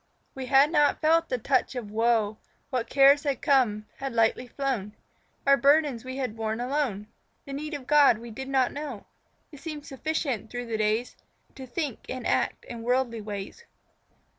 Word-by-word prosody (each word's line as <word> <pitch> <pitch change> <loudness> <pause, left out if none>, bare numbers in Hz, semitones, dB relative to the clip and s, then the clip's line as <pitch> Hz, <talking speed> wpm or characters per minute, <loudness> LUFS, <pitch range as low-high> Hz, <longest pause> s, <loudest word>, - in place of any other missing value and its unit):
We 265 -1 -6
had 275 +3 +5
not 295 -3 +3
felt 325 +2 +3
the 255 - 0
touch 260 +2 0
of 225 -5 -5
woe; 220 -1 +1 0.3
What 250 -3 -2
cares 275 +1 +6
had 280 -4 -1
come, 245 -8 +2
had 270 -2 -4
lightly 230 +2 +2
flown; 245 -6 -3 0.5
Our 275 0 +6
burdens 280 -2 +3
we 260 +1 -6
had 255 -5 -3
borne 220 0 -3
alone 250 -5 -1 0.4
The 275 - -7
need 300 +2 -4
of 275 -3 -8
God 290 -5 +5
we 235 +1 -10
did 265 +4 -7
not 265 -2 +2
know. 285 -7 -6 0.5
It 290 - -12
seemed 300 -1 -7
sufficient 270 - -3
through 245 0 -5
the 225 -2 -3
days 215 +3 0 0.4
To 260 -1 -10
think 275 -1 -3
and 255 -1 -5
act - - 0
in 235 -1 -7
worldly 240 -1 0
ways. 205 - -7
255 Hz, 175 wpm, -27 LUFS, 230-280 Hz, 0.5 s, cares